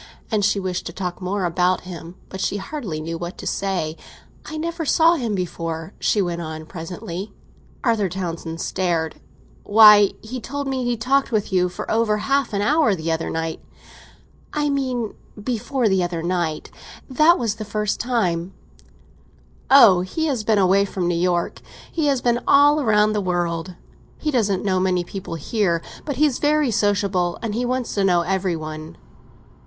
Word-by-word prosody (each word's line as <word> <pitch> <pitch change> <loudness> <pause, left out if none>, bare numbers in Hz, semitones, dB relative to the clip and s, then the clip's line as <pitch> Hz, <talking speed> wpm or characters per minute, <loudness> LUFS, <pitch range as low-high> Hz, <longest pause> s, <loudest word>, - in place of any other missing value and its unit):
And 210 -2 +1
she 200 0 +2
wished 185 -2 -3
to - - -7
talk 180 -1 -5
more 185 +1 -1
about 180 +1 +1
him; 175 -1 -9
but 190 - -6
she 205 - 0
hardly 200 - -5
knew 165 +1 -5
what 175 +1 -6
to - - -8
say. 180 -5 -2 0.5
"I 310 - -5
never 335 +1 -3
saw 325 +2 +4
him 235 -10 -1
before," 165 -1 -4
she 205 - +2
went 170 -1 -3
on 155 -1 -6
presently. 175 +3 -7 0.5
Arthur 225 -6 +1
Townsend 170 -2 -5
stared. 170 -4 -1 0.4
"Why, 210 -1 +7
he 250 +4 -6
told 285 +3 -4
me 265 -1 -1
he 245 -1 0
talked 270 +5 +1
with 210 -3 -1
you 180 -1 +3
for 175 - -6
over 220 -1 +2
half 275 +3 0
an 200 -1 -1
hour 290 -4 +3
the 165 -1 -3
other 160 0 -1
night." 165 0 -3 0.9
"I 295 -1 0
mean 255 -5 -1 0.3
before 245 +2 -1
the 190 -2 +2
other 170 -2 -3
night. 170 -3 -2 0.4
That 310 +6 +4
was 230 -4 -1
the 215 - -5
first 210 0 -2
time." 190 -7 -1 1.1
"Oh, 220 -10 +8
he 250 - -2
has 265 -8 -1
been 220 0 +2
away 195 +1 +4
from 190 -3 -2
New 175 - +1
York—he 180 - -2
has 275 -3 +1
been 240 -1 +2
all 290 +1 +5
round 215 -2 +3
the 210 - 0
world. 175 -1 -2 0.4
He 305 - -2
doesn't 205 -7 0
know 185 -2 +2
many 185 -1 +1
people 190 -1 -6
here, 170 +1 0 0.3
but 285 - -3
he's 285 -1 +2
very 295 -3 +2
sociable, 200 -4 +1
and 220 -2 -2
he 240 +3 -1
wants 255 0 -2
to 200 - 0
know 180 -3 +3
every 185 0 -1
one." 155 0 -7
200 Hz, 170 wpm, -22 LUFS, 175-240 Hz, 1.1 s, Oh